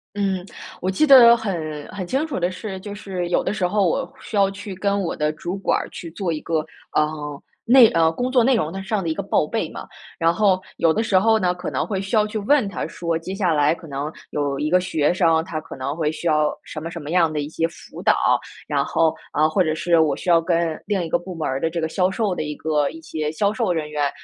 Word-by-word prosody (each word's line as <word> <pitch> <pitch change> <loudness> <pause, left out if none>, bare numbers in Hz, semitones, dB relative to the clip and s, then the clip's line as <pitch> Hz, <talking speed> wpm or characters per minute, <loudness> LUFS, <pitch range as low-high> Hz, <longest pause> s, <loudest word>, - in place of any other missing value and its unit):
嗯， 195 -3 -1 0.4
我 185 - 0
记 250 +11 +2
得 245 -4 +9
很 160 -9 -4
很 190 -3 -6
清 270 - 0
楚 285 -11 -4
的 175 +1 +1
是， 190 0 -6
就 205 +1 -7
是 190 -4 -4
有 175 - +1
的 - - -1
时 195 -4 0
候 200 +1 +2
我 265 +10 -1
需 220 - -7
要 195 -1 +4
去 200 0 -8
跟 200 +2 0
我 180 - -2
的 150 -1 0
主 175 +4 -5
管 195 - +1
儿 - - -5
去 170 - -8
做 175 0 -2
一 155 - -3
个， 160 -1 -1 0.3
呃， 150 -2 -1 0.2
内 245 -1 +8
呃， 165 -3 +3
工 245 +10 -3
作 250 -2 +5
内 260 +3 +4
容 160 -7 -1
的 195 +1 -5
上 200 +1 -1
的 170 - -3
一 - - 0
个 200 - -3
报 195 -5 +1
备 - - -2
嘛。 - - -8 0.3
然 165 0 +3
后 190 0 +2 0.2
有 165 - +4
的 220 - +1
时 200 -4 +3
候 220 +3 +3
呢， 180 -4 +1
可 180 -1 -5
能 - - -1
会 195 -4 -2
需 195 +4 -2
要 210 -1 +4
去 215 +1 -4
问 245 +3 +3
他 - - -3
说， 170 -1 -2
接 185 +3 -6
下 190 -4 +1
来 150 0 +3
可 170 - -13
能 145 +1 -4 0.2
有 145 -2 -1
一 150 +2 -1
个 180 +1 +4
学 160 -5 +1
生， 165 -3 +2
他 165 -4 -4
可 165 - -10
能 135 +2 -3
会 155 -2 0
需 160 +2 -7
要 155 -2 +3
什 155 - -7
么 165 +2 -5
什 170 - -6
么 145 0 -7
样 170 -2 +3
的 150 - -1
一 145 - -4
些 165 +1 -1
辅 165 - -12
导。 - - +4 0.5
然 - - +1
后 160 -1 +2 0.2
啊， 155 +1 +3
或 185 +4 +2
者 155 -3 0
是 170 +1 +2
我 150 -3 +2
需 180 - -3
要 170 -1 +6
跟 165 -1 0
另 200 -4 0
一 165 - -4
个 - - +2
部 180 +1 -8
门 160 -2 -3
儿 130 +1 -1
的 165 - +1
这 170 +1 -3
个 160 - 0
销 180 +2 +1
售 200 -1 -1
的 - - -3
一 150 -1 -4
个 150 -2 0
一 160 - -10
些 155 -1 -3
销 200 +6 0
售 220 -2 -1
人 155 -3 -3
员， 145 -2 0
175 Hz, 290 characters per minute, -22 LUFS, 155-200 Hz, 0.5 s, 得